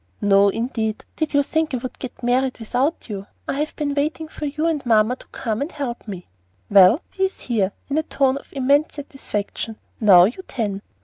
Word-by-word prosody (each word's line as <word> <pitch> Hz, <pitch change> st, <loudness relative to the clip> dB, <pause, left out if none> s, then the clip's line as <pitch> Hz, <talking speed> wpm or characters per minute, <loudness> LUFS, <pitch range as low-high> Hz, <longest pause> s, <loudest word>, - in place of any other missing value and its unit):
"No, 200 Hz, 0 st, +5 dB
indeed. 225 Hz, -1 st, -2 dB
Did 315 Hz, -2 st, -2 dB
you 285 Hz, -, +5 dB
think 315 Hz, -1 st, 0 dB
I -, -, 0 dB
would 250 Hz, +1 st, -7 dB
get 255 Hz, -1 st, -8 dB
'mawwied' 250 Hz, +2 st, +1 dB
without 255 Hz, +8 st, -1 dB
you? 200 Hz, -3 st, -6 dB, 0.2 s
I 275 Hz, -, -2 dB
have 305 Hz, +1 st, -2 dB
been 290 Hz, -2 st, -1 dB
waiting 305 Hz, +3 st, -1 dB
for 310 Hz, -, -6 dB
you 305 Hz, +3 st, -2 dB
and 320 Hz, -4 st, 0 dB
mamma 225 Hz, 0 st, +3 dB
to -, -, -16 dB
come 220 Hz, -1 st, -3 dB
and 295 Hz, +5 st, -2 dB
help 250 Hz, -6 st, -5 dB
me." 190 Hz, -4 st, -6 dB, 0.5 s
"Well, 200 Hz, -, +7 dB, 0.2 s
we 385 Hz, -, +4 dB
is 380 Hz, -, -5 dB
here," 210 Hz, -6 st, 0 dB, 0.2 s
in 285 Hz, +2 st, +1 dB
a -, -, +2 dB
tone 275 Hz, -4 st, +1 dB
of -, -, -19 dB
immense 280 Hz, +3 st, +2 dB
satisfaction. 230 Hz, -6 st, -4 dB, 0.2 s
"Now 195 Hz, -5 st, +8 dB
you 235 Hz, -, 0 dB
tan." 205 Hz, -6 st, -2 dB
255 Hz, 200 wpm, -22 LUFS, 215-290 Hz, 0.5 s, Now